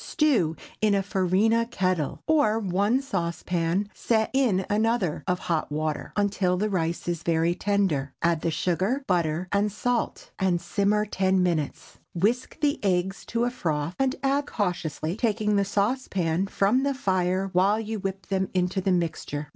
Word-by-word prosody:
Stew 240 - +2 0.3
in 210 -2 +3
a 195 - +1
farina 205 +4 +2
kettle, 185 - -1
or 290 -9 +3
one 205 +5 +1
saucepan 175 -2 -1
set 220 -2 0
in 225 -9 +2
another 215 -5 0
of 180 -1 +1
hot 165 -4 -2
water, 155 0 -2
until 200 -3 +1
the 210 +2 -1
rice 170 -2 -1
is 175 -2 -1
very 165 0 +1
tender. 180 -9 0
Add 170 -2 +2
the - - 0
sugar, 185 - 0
butter 170 -2 0
and 205 +1 +1
salt, 240 +3 -2
and 185 -2 +2
simmer 210 +3 +1
ten 190 -2 +1
minutes. 160 -5 -2 0.2
Whisk 225 +9 0
the 290 -1 +1
eggs 190 0 0
to 230 0 0
a 245 - +1
froth, 160 -8 -2
and 270 -1 +1
add 280 +1 +1
cautiously, 175 -4 -2
taking 215 -2 +1
the 200 - +3
saucepan 200 -4 0
from 205 +6 +2
the 280 0 0
fire 190 -4 0
while 195 +4 +3
you 220 -1 -4
whip 195 -1 -4
them 190 0 -1
into 180 +1 +1
the 190 0 +1
mixture. 160 -4 -2
195 Hz, 160 wpm, -26 LUFS, 175-215 Hz, 0.3 s, in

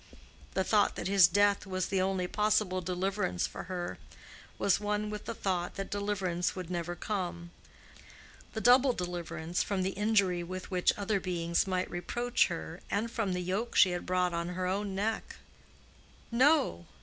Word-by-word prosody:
The 190 - +2
thought 210 +1 +3
that - - -3
his 195 -3 +7
death 205 +2 +2
was 185 -1 -1
the 190 -1 +1
only 190 -1 0
possible 210 -1 +1
deliverance 185 - -1
for - - -7
her 180 -1 -4 0.6
was 200 - +2
one 210 0 -1
with 210 0 -6
the 230 - -4
thought 180 -4 -2
that 195 - -5
deliverance 195 -4 -1
would 180 -2 -6
never 175 0 -3
come—the 175 -4 -4 1.1
double 250 +3 +6
deliverance 175 -2 -3
from 195 -2 -1
the 190 - 0
injury 200 -3 +2
with 185 +2 -6
which 180 -1 +3
other 205 0 0
beings 170 -1 0
might 185 -1 0
reproach 240 +7 0
her 170 -1 -6
and 225 +3 -1
from 225 -6 -1
the 180 - -2
yoke 200 +7 -2
she 185 - +6
had 175 - -4
brought 180 -1 +1
on 170 0 -2
her 180 +1 -3
own 195 +1 -1
neck. 215 +3 -2 1.0
No! 255 - +3
185 Hz, 160 wpm, -31 LUFS, 180-205 Hz, 1.1 s, his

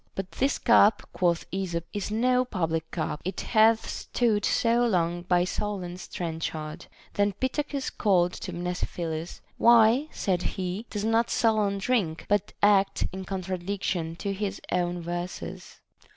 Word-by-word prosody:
But 195 -1 -4
this 275 +2 0
cup, 215 -3 +4
quoth 170 -2 +1
Esop, 175 -3 -2
is 205 -2 -3
no 250 +4 +2
public 165 -8 -2
cup, 155 -3 -3
it 185 +1 -3
hath 225 0 +4
stood 220 -4 0
so 235 +1 +2
long 175 -6 +1
by 175 0 +2
Solon's 185 -2 -4
trenchard. 160 -2 -5 0.3
Then 205 0 +1
Pittacus 275 +4 -2
called 180 -4 +2
to 185 - -6
Mnesiphilus: 170 -2 -4 0.2
Why, 235 +4 +6
saith 180 -3 -1 0.2
he, 190 +4 -3
does 205 0 -3
not 225 +1 +2
Solon 215 -3 +2
drink, 195 -7 0
but 205 0 +1
act 200 -1 +4
in 190 0 -6
contradiction 185 -2 -3
to 200 +3 -3
his 200 0 -3
own 175 -1 0
verses? 175 +1 -6
195 Hz, 135 wpm, -27 LUFS, 175-220 Hz, 0.3 s, Why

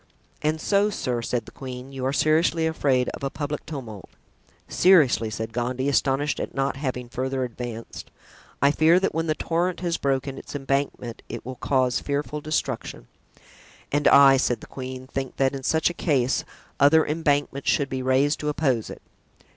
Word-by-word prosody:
"And 155 +1 0
so, 200 +4 +2
sir," 125 - -2
said 115 -1 -2
the - - -12
queen, 130 0 -8
"you 135 -1 -6
are - - +1
seriously 160 +3 +2
afraid 135 -6 +1
of - - -8
a 135 - 0
public 145 +1 -4
tumult." 120 - -7 0.6
"Seriously," 145 - +4
said 110 +1 -5
Gondy, 125 +3 -1
astonished 140 +1 +1
at - - -5
not 135 0 0
having 130 -3 -4
further 130 +2 -2
advanced; 120 -1 -7 0.5
"I 140 - +6
fear 160 +4 +4
that 195 - 0
when 165 +1 -1
the 155 - +1
torrent 175 +3 -1
has 170 -2 -1
broken 135 0 -1
its - - -10
embankment 135 -4 -2
it - - -7
will 130 - -5
cause 130 0 +1
fearful 145 +1 -3
destruction." 145 -5 -3 0.8
"And 145 +1 +2
I," 135 -1 +8
said 125 -2 0
the - - -9
queen, 130 -1 -7
"think 135 -1 -5
that 135 0 +1
in 135 - -5
such 160 +5 +1
a - - -8
case 135 -7 0 0.3
other 155 +3 +5
embankments 145 -3 0
should 140 - +2
be 130 -1 -3
raised 130 +3 +2
to 150 - -2
oppose 130 -6 0
it. - - -10
135 Hz, 175 wpm, -24 LUFS, 130-150 Hz, 0.8 s, I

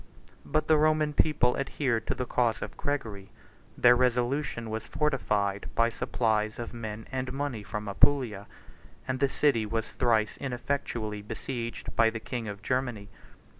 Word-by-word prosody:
84 - - -17
But 155 0 +1
the 155 - +5
Roman 155 0 +3
people 140 -5 +3
adhered 130 -5 -1
to - - 0
the 125 - -2
cause 120 -2 +1
of - - -7
Gregory: 110 -9 -3 0.5
their 120 0 +7
resolution 125 -1 0
was 110 0 -3
fortified 105 -9 0
by 115 0 +4
supplies 110 -3 0
of 120 0 -6
men 110 -2 -6
and 130 -1 -2
money 135 -4 -3
from 105 +1 -5
Apulia; 110 -2 +2 0.6
and 130 0 -1
the 140 - +3
city 135 -6 +2
was 115 +1 -3
thrice 110 -3 +2
ineffectually 120 -5 -3
besieged 115 +2 -5
by 115 -1 +5
the 110 0 -5
king 115 0 -4
of 100 0 -7
Germany. 125 -6 -1
120 Hz, 155 wpm, -29 LUFS, 110-135 Hz, 0.6 s, their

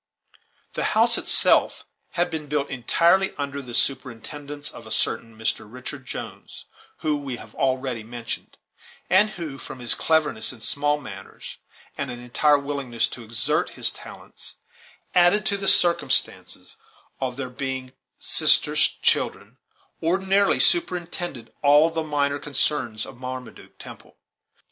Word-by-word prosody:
The - - -2
house - - +4
itself - - +3 0.3
had 175 0 0
been 155 -2 -4
built 145 -1 -1
entirely 170 +9 +2
under 140 -1 -4
the 125 -3 -7
superintendence 140 +3 -3
of 115 - -12
a - - -10
certain 110 +1 -1
Mr. 110 -1 -3
Richard 130 +1 -8
Jones, - - -8 0.4
whom 150 -2 -1
we 135 -3 -4
have - - -12
already 130 -3 -1
mentioned, 115 +1 -7 0.5
and 200 +4 +5
who, 160 -9 -7
from - - -8
his 120 -1 +5
cleverness 155 -8 +1
in 130 - -13
small 145 +5 +1
matters, 140 - -10 0.4
and - - -2
an 120 - -6
entire 145 +5 +3
willingness 140 -5 -1
to 120 - -9
exert 115 +7 0
his - - +2
talents, - - -10 0.6
added 180 +4 +4
to 200 - +2
the 195 -1 -2
circumstance 175 -2 +2 0.6
of 130 -1 -3
their 130 -2 -5
being 130 0 -4 0.3
sisters' - - +5
children, - - 0 0.4
ordinarily 190 +4 +2
superintended 175 - 0
all 145 +3 +5
the 165 0 -2
minor 145 -2 0
concerns 140 -6 0
of 125 - -12
Marmaduke 130 -1 -8
Temple. - - -12
140 Hz, 135 wpm, -24 LUFS, 125-160 Hz, 0.6 s, and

